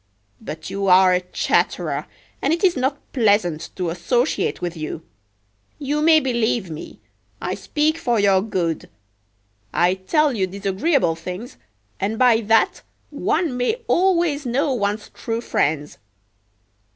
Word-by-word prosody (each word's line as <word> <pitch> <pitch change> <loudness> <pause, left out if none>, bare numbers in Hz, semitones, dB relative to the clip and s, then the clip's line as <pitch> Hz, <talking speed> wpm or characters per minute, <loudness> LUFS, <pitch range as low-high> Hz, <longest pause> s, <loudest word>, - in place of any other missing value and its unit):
But 155 0 -7
you 195 0 -2
are 185 0 +6
a 180 - +2
chatterer, 180 - -1 0.3
and 280 - +1
it 335 +3 0
is 365 -2 +4
not 265 +2 0 0.2
pleasant 200 - +1
to 180 -3 -2
associate 240 - 0
with 175 -1 -4
you. 155 0 -5 0.7
You 295 +1 -1
may 315 0 +6
believe 235 - 0
me, 155 - -9 0.4
I - - -3
speak 310 +2 0
for 240 -8 +1
your 195 -2 +4
good. 180 -6 -2 0.8
I 175 +1 +3
tell 290 - +1
you 195 -5 0
disagreeable 195 - 0
things, 180 +8 -7 0.4
and 210 +3 -1
by 240 -2 +4
that 225 0 +3 0.3
one 320 -8 0
may 250 - +1
always 345 -7 +2
know 270 +3 0
one's 210 -2 -2
true 225 0 -4
friends! 150 -9 -1
220 Hz, 135 wpm, -21 LUFS, 185-280 Hz, 0.8 s, are